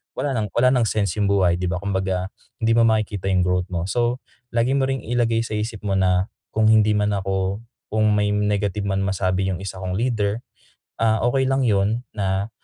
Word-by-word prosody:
wala 145 - -1
ng 105 - -1
wala 125 +2 +4
ng 125 -4 +2
sense 105 -2 -1
yung 100 - +2
buhay, 95 -3 +2
di 90 - -1
ba? 90 +1 -2
Kumbaga 95 -1 -1 0.3
hindi 115 - +3
mo 115 0 +5
makikita 110 -3 0
yung 95 -2 +2
growth 90 0 0
mo. 85 -2 -3
So, 120 +3 -1 0.3
lagi 120 +2 +2
mo 135 -1 +2
ring 135 -1 -2
ilagay 115 -1 +1
sa 110 - -4
isip 110 0 -5
mo 100 -2 0
na 90 +1 +1 0.2
kung 110 0 +4
hindi 110 -1 +4
man 105 0 +1
ako 95 0 -1 0.3
kung 110 0 +2
may 105 0 +1
negative 105 -1 0
man 95 0 0
masabi 95 0 0
yung 90 - -4
isa 95 -1 -6
kong 90 0 -2
leader, 110 -3 0 0.6
ah, 110 -1 +2
okey 135 +1 +1
lang 135 +1 +1
yun 105 +1 +1
na, 100 0 -1
105 Hz, 205 wpm, -22 LUFS, 95-115 Hz, 0.6 s, mo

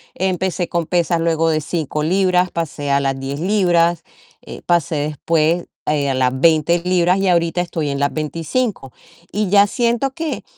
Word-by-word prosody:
Empecé 185 -1 -1
con 170 -1 -1
pesas, 170 -1 +1
luego 165 -1 +1
de 155 -1 0
5 150 -1 -3
libras, 180 +1 +2
pasé 150 -3 -4
a 140 - +3
las 135 -1 -1
10 135 +2 -5
libras, 175 -3 +2 0.4
eh, - - -10
pasé 170 -2 +1
después 155 +3 0 0.2
a - - +1 0.2
las 130 0 0
20 165 +2 +3
libras 180 0 +2
y 195 - 0
ahorita 170 0 +1
estoy 165 -4 -3
en 140 0 -3
las 140 0 0
25, 160 - -3 0.4
y 210 -1 -1
ya 200 +1 +5
siento 240 +4 0
que 325 +2 -4
170 Hz, 165 wpm, -19 LUFS, 155-185 Hz, 0.4 s, ya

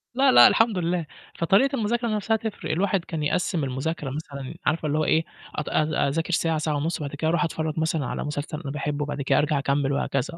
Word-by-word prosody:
لا، 270 +1 +5
لأ، - - +9
الحمد 225 -3 +3
لله. 175 -1 -1 0.3
فطريقة 205 - +3
المذاكرة 235 0 0
نَفْسها 215 0 0
تفرق، 220 -1 -5
الواحد 190 +1 0
كان 160 -2 -4
يقّسم 170 +1 0
المذاكرة 135 +3 -3
مثلًا 140 -2 -6
عارفة 155 +1 +1
اللي 150 +1 0
هو 155 - +2
إيه، 160 - +3 0.3
أت 150 - -3
أ 155 -2 +1
أذاكر 165 +5 -1
ساعة، 165 -1 +1
ساعة 155 0 -1
ونُص، 155 +4 -1
بعد 145 -1 -5
كده 155 +2 -1
أروح 170 +2 +2
أتفرج 160 -2 -2
مثلًا 160 -2 0
على - - -3
مسلسل 150 +1 -4
أنا 140 -5 -5
باحبه، 145 0 -2
وبعد 145 -1 -4
كده 135 - +2
أرجع 150 -1 +2
أكمل 140 0 0
وهكذا. 140 +4 -1
155 Hz, 215 wpm, -25 LUFS, 145-180 Hz, 0.3 s, لأ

